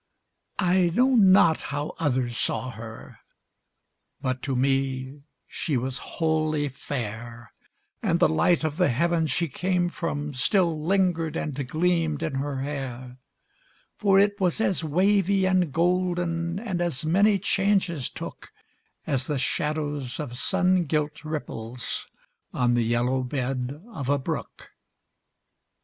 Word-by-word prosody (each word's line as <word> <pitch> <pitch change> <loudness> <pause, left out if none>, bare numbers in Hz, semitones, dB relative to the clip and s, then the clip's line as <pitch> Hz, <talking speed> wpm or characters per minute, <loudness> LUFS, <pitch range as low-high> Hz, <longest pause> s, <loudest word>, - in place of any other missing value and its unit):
I 180 -1 +3
know 260 +2 +4
not 190 -7 +6
how 145 +1 -4
others 130 -5 0
saw 130 +2 -1
her, 115 0 -10 1.0
But 130 -1 -2
to 135 - -2
me 135 +1 0 0.2
she 150 -7 -2
was 130 +1 -2 0.2
wholly 155 -2 +1
fair, 115 -4 -6 0.5
And - - +1
the - - +6
light 115 - +2
of 155 -1 -2
the 180 - +3
heaven 165 +5 +1
she 165 +5 0
came 180 +4 0
from 150 -4 -3
Still 165 +3 +2
lingered 175 -3 +1
and 150 - -2
gleamed 160 0 0
in 160 -3 -2
her 135 0 -2
hair; 130 -3 -5 0.8
For 195 -2 +3
it 205 +1 +3
was 180 0 +1
as 195 -6 +1
wavy 195 +4 +2
and 185 -4 +2
golden, 175 0 0
And 195 -5 -3
as 160 -5 -1
many 200 +6 +4
changes 195 -6 +1
took, - - -8 0.5
As 130 -2 0
the 150 - -1
shadows 145 0 -2
of 135 -5 -5
sun 185 +4 +2
gilt 150 0 -2
ripples 125 -6 -4 0.5
On 120 -1 +2
the 120 -1 +2
yellow 120 +3 +1
bed 130 +1 -3
of 140 -8 -4
a 145 - +3
brook. 135 - -5
155 Hz, 130 wpm, -26 LUFS, 130-180 Hz, 1.0 s, not